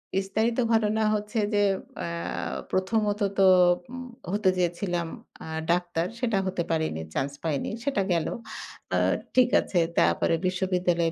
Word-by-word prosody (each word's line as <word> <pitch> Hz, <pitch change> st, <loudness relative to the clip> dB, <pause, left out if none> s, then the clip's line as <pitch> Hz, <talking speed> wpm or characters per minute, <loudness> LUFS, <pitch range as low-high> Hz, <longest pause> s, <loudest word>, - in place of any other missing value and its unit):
বিস্তারিত 215 Hz, +5 st, 0 dB, 0.2 s
ঘটনা 220 Hz, 0 st, +2 dB
হচ্ছে 210 Hz, +1 st, -2 dB
যে 205 Hz, -, +3 dB, 0.4 s
অ্যা -, -, -3 dB, 0.6 s
প্রথমত 205 Hz, +2 st, 0 dB, 0.2 s
তো 195 Hz, -, +7 dB, 0.4 s
উম 255 Hz, 0 st, -7 dB, 0.2 s
হতে 205 Hz, -2 st, +2 dB
চেয়েছিলাম 175 Hz, -1 st, -1 dB, 0.4 s
আ -, -, -8 dB, 0.2 s
ডাক্তার, 175 Hz, -1 st, 0 dB
সেটা 230 Hz, -5 st, +1 dB
হতে 185 Hz, -2 st, -1 dB
পারেনি, 160 Hz, -, -1 dB
চান্স 135 Hz, +1 st, -1 dB
পাইনি, 155 Hz, 0 st, -1 dB
সেটা 270 Hz, -7 st, 0 dB
গেল। 170 Hz, -2 st, +1 dB, 0.7 s
আ -, -, +3 dB, 0.4 s
ঠিক 255 Hz, -1 st, +5 dB
আছে 180 Hz, -, -1 dB, 0.2 s
তারপরে 165 Hz, -, +3 dB
বিশ্ববিদ্যালয়ে 180 Hz, -2 st, +1 dB
190 Hz, 130 wpm, -26 LUFS, 170-215 Hz, 0.7 s, তো